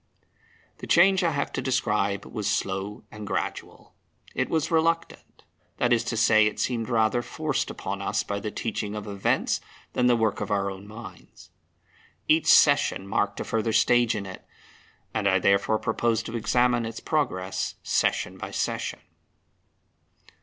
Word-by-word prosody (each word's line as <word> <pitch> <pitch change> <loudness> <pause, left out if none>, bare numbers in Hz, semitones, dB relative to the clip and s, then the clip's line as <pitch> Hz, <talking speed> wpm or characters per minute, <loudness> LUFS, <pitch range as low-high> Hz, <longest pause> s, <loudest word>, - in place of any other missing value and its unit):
The - - -8
change 190 +2 +5
I 170 - +3
have 145 -3 -2
to - - -2
describe 105 -6 0
was 105 -4 -3
slow 95 +2 -2
and 105 -1 -8
gradual. - - -5 0.4
It 130 - -1
was 160 0 0
reluctant 165 +1 -1 0.3
that 120 0 +2
is 115 - +2
to 115 - -2
say, 110 -1 +5
it 105 - -4
seemed 115 -2 -1
rather 115 0 +2
forced 155 +2 -2
upon 100 +1 -5
us 105 +2 -1
by 100 0 -3
the 105 - -4
teaching 105 -2 -4
of 105 -1 -5
events 100 -2 0 0.3
than 125 - +2
the 120 - +5
work 110 -3 0
of - - -3
our 100 -1 0
own 95 +1 -10
minds. 110 +2 -12 0.8
Each 155 +1 +3
session 145 -9 +5
marked 100 +1 -1
a - - -1
further 110 0 -1
stage 120 0 +3
in 100 -2 -4
it; 95 -1 -9 0.7
and 105 -2 0
I 95 - +4
therefore 100 +3 +2
propose 115 +1 0
to 115 - -6
examine 120 +1 +2
its 115 - -6
progress 95 -12 -2
session - - 0
by - - -5
session. - - -3
110 Hz, 160 wpm, -26 LUFS, 100-125 Hz, 0.8 s, change